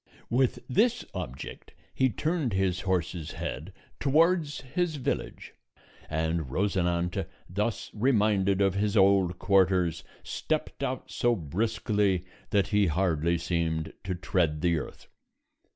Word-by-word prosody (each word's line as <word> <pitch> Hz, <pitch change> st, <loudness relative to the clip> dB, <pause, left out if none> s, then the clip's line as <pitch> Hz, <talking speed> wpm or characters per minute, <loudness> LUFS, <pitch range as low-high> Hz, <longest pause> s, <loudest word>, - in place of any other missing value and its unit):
With 125 Hz, +1 st, +1 dB
this 230 Hz, -, +2 dB
object 70 Hz, -9 st, -7 dB, 0.2 s
he 130 Hz, 0 st, +3 dB
turned 150 Hz, -, -1 dB
his 95 Hz, -1 st, +1 dB
horse's 90 Hz, -4 st, -2 dB
head 80 Hz, +7 st, -5 dB, 0.3 s
towards 155 Hz, +2 st, +2 dB
his 160 Hz, +5 st, -1 dB
village, 135 Hz, -, -3 dB, 0.6 s
and 80 Hz, -1 st, -1 dB
Rosinante, 90 Hz, 0 st, 0 dB, 0.2 s
thus 105 Hz, +5 st, -2 dB
reminded 105 Hz, -5 st, +2 dB
of 95 Hz, -1 st, +3 dB
his 105 Hz, +2 st, 0 dB
old 95 Hz, -2 st, +4 dB
quarters, 95 Hz, -4 st, +2 dB, 0.2 s
stepped -, -, -3 dB
out -, -, -3 dB
so 120 Hz, 0 st, +2 dB
briskly 100 Hz, +1 st, 0 dB, 0.2 s
that 100 Hz, -1 st, +2 dB
he 105 Hz, -2 st, +3 dB
hardly 85 Hz, 0 st, +1 dB
seemed 80 Hz, -2 st, -1 dB
to 95 Hz, -1 st, -2 dB
tread 85 Hz, -4 st, 0 dB
the 85 Hz, -2 st, +2 dB
earth. -, -, -9 dB
95 Hz, 120 wpm, -28 LUFS, 85-110 Hz, 0.6 s, old